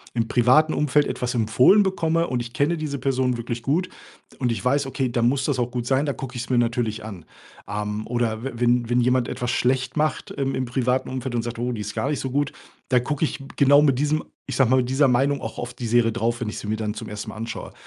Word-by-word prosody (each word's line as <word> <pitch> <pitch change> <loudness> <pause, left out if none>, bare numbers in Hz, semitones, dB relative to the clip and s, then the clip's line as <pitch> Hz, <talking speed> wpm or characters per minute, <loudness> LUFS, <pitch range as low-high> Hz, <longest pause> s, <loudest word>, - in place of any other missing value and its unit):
im 115 -1 0
privaten 130 +7 +4
Umfeld 150 0 +2
etwas 125 0 -2
empfohlen 125 - +5
bekomme 170 -4 +1
und 125 - -1
ich 120 0 -6
kenne 150 +6 +1
diese 150 -3 -4
Personen 130 -1 +1
wirklich 120 0 -5
gut, 170 +8 0 0.5
und 125 -2 0
ich 110 -4 -3
weiß, 140 +2 +2
okay, 135 -1 -2
dann 120 -1 +2
muss 135 +2 +1
das 145 -3 0
auch 120 -1 -1
gut 120 -1 -3
sein. 135 +2 +2
Dann 140 - -2
gucke 130 -2 -6
ich 120 - -3
es - - -10
mir 125 - +4
natürlich 115 -2 -1
an, 100 -7 -8 0.4
am. 105 +1 -3
Oder 115 -1 -1
w 135 - -2
wenn 120 0 +1
wenn 125 0 +3
jemand 125 0 +2
etwas 125 - -3
schlecht 130 +2 0
macht 155 +1 0
im 135 -1 -2
im 130 - -1
privaten 125 +1 0
Umfeld 130 -1 -4
und 120 - 0
sagt: 120 0 -5
„Oh, 120 +1 -1
die 115 -3 -4
ist 105 +1 -6
gar 135 - -1
nicht 145 - -1
so 130 - -3
gut.” 145 +2 0 0.4
Da 125 - +4
gucke 145 +5 -1
ich 155 - -4
m 135 - -10
genau 140 +1 +6
mit 140 -4 +3
diesem, 150 +2 +1 0.2
ich - - -4
sage 135 -4 +3
mal, 130 - +5
mit 125 -1 +1
dieser 140 +2 +4
Meinung 135 +3 +2
auch - - -6
auf 120 0 -5
die 120 -1 -5
Serie 115 0 +3
drauf, 120 +1 -1
wenn 115 - -2
ich - - -6
sie - - -7
mir 110 +1 -1
dann 105 -1 -2
zum 105 - -7
1. 105 0 -6
Mal - - -8
anschaue. 115 +1 -6
125 Hz, 265 wpm, -23 LUFS, 120-140 Hz, 0.5 s, genau